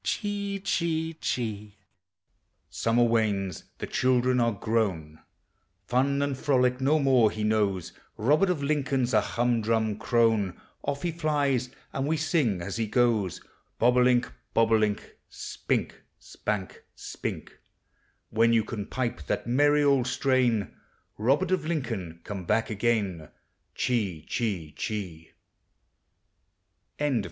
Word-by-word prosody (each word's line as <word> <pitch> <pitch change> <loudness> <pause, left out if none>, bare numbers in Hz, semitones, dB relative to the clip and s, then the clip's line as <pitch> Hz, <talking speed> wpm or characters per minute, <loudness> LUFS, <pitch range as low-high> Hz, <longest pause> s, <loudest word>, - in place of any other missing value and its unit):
Chee, 200 -2 -2
chee, 165 -3 -1
chee. 105 -8 -4 0.9
Summer 115 +1 +2
wanes; 105 -6 0
the - - -4
children 125 0 +2
are 115 -1 +3
grown; 95 -8 -1 0.7
Fun 135 +5 +1
and 140 -1 -1
frolic 130 -2 +1
no 145 +4 +3
more 130 -6 +4
he 110 0 -4
knows; 105 -5 0 0.2
Robert 150 - +3
of 165 -6 -1
Lincoln's 135 -4 0
a 105 - +5
humdrum 115 -2 0
crone; 110 -5 +2 0.2
Off 140 +2 -3
he 175 - 0
flies, 145 -6 0 0.2
and 135 +1 -1
we 160 +1 +1
sing 145 - +1
as 95 +4 -4
he 115 -1 -1
goes: 110 -5 +1 0.4
Bob 125 +2 +4
o' 125 - +5
link, 125 -1 +3 0.2
bob 115 0 +3
o' - - +6
link, 105 -2 -1
Spink, - - -3 0.2
spank, 100 -3 -5
spink; - - -6 0.7
When 115 +1 +3
you 115 -1 +4
can 105 -2 -5
pipe 115 - -3
that - - -1
merry 145 +4 +3
old 140 -3 +3
strain, 125 -6 +1 0.4
Robert 140 - +2
of 185 -4 0
Lincoln, 110 - -3
come 95 -3 -6
back 110 +4 +1
again. 100 -7 -1
120 Hz, 120 wpm, -27 LUFS, 105-140 Hz, 0.9 s, o